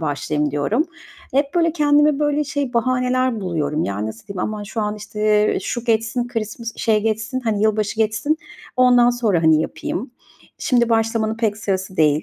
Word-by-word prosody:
başlayayım 150 Hz, 0 st, -1 dB
diyorum. 145 Hz, -, +1 dB, 0.5 s
Hep, 280 Hz, +3 st, +1 dB
böyle, 335 Hz, -2 st, +3 dB
kendime, 295 Hz, -2 st, +3 dB
böyle, 295 Hz, 0 st, +1 dB
şey 280 Hz, -2 st, -3 dB
bahaneler 255 Hz, 0 st, +1 dB
buluyorum. 160 Hz, -4 st, -1 dB
Yani, 100 Hz, +2 st, -2 dB
nasıl 110 Hz, +1 st, -8 dB
diyeyim, 200 Hz, -2 st, -7 dB
"Aman 215 Hz, +1 st, -3 dB
şu 215 Hz, +2 st, -4 dB
an, 210 Hz, 0 st, -1 dB
işte, 210 Hz, 0 st, -8 dB, 0.3 s
eee, -, -, -1 dB
şu 240 Hz, -1 st, -4 dB
geçsin, 225 Hz, +1 st, 0 dB
Christmas 225 Hz, 0 st, -4 dB
şey, 215 Hz, -2 st, +2 dB
geçsin, 220 Hz, +3 st, -1 dB
hani, 220 Hz, -4 st, -1 dB
yılbaşı 215 Hz, 0 st, +1 dB
geçsin, 225 Hz, +8 st, +1 dB, 0.4 s
ondan 245 Hz, -1 st, +5 dB
sonra, 220 Hz, -9 st, +1 dB
hani, 160 Hz, -1 st, +5 dB
yapayım. 185 Hz, -, -4 dB, 0.5 s
Şimdi 240 Hz, -2 st, +2 dB
başlamanın 225 Hz, -1 st, +1 dB
pek 220 Hz, -3 st, 0 dB
sırası 190 Hz, -3 st, -3 dB
değil. 150 Hz, -2 st, +3 dB
220 Hz, 165 wpm, -20 LUFS, 195-250 Hz, 0.5 s, ondan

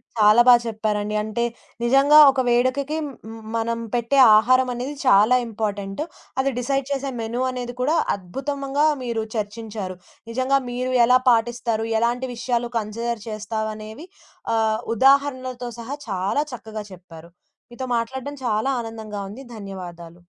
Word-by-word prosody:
చాలా 215 Hz, +1 st, +6 dB
బా 250 Hz, -, +10 dB
చెప్పారండి. 215 Hz, -2 st, -2 dB
అంటే 220 Hz, +2 st, -2 dB, 0.4 s
నిజంగా 275 Hz, +5 st, +5 dB
ఒక 265 Hz, -, -3 dB
వేడుకకి 255 Hz, +5 st, +1 dB
మ్ -, -, -4 dB, 0.3 s
మ్ -, -, -9 dB, 0.2 s
మనం 230 Hz, 0 st, -1 dB
పెట్టే 240 Hz, +3 st, 0 dB, 0.2 s
ఆహారమనేది 255 Hz, +3 st, +1 dB
చాలా 220 Hz, +1 st, +6 dB
ఇంపార్టెంటు. 205 Hz, +1 st, -3 dB, 0.4 s
అది 270 Hz, +1 st, +2 dB
డిసైడ్ 275 Hz, +2 st, -1 dB
చేసే 275 Hz, 0 st, -2 dB
మెనూ 230 Hz, +2 st, -3 dB
అనేది 245 Hz, -1 st, -5 dB
కూడా 295 Hz, +6 st, +2 dB, 0.2 s
అద్భుతముగా 275 Hz, +9 st, -2 dB, 0.2 s
మీరు 230 Hz, -2 st, -2 dB
చర్చించారు. 210 Hz, -2 st, -4 dB, 0.4 s
నిజంగా 260 Hz, +3 st, +2 dB
మీరు 250 Hz, +1 st, -2 dB
ఎలా 250 Hz, +2 st, +5 dB
పాటిస్తారు, 230 Hz, -1 st, +1 dB
ఎలాంటి 240 Hz, +2 st, 0 dB
విషయాలు 240 Hz, 0 st, -1 dB
కన్సిడర్ 230 Hz, +1 st, -3 dB
చేస్తావనేవి 220 Hz, -, -5 dB, 0.5 s
ఆహ్, 220 Hz, -1 st, +1 dB, 0.2 s
ఉదాహరణలతో 260 Hz, -1 st, +2 dB
సహా 245 Hz, +5 st, -5 dB
చాలా 195 Hz, +9 st, 0 dB
చక్కగా 220 Hz, -3 st, -7 dB
చెప్పారు. 170 Hz, -2 st, -13 dB, 0.4 s
మీతో 260 Hz, +2 st, -6 dB
మాట్లాడడం 265 Hz, +5 st, -4 dB
చాలా 220 Hz, +4 st, +1 dB
ఆనందంగా 220 Hz, -3 st, -7 dB
ఉంది. 240 Hz, +7 st, -9 dB
ధన్యవాదాలు. 175 Hz, -4 st, -9 dB
235 Hz, 125 wpm, -22 LUFS, 215-255 Hz, 0.5 s, బా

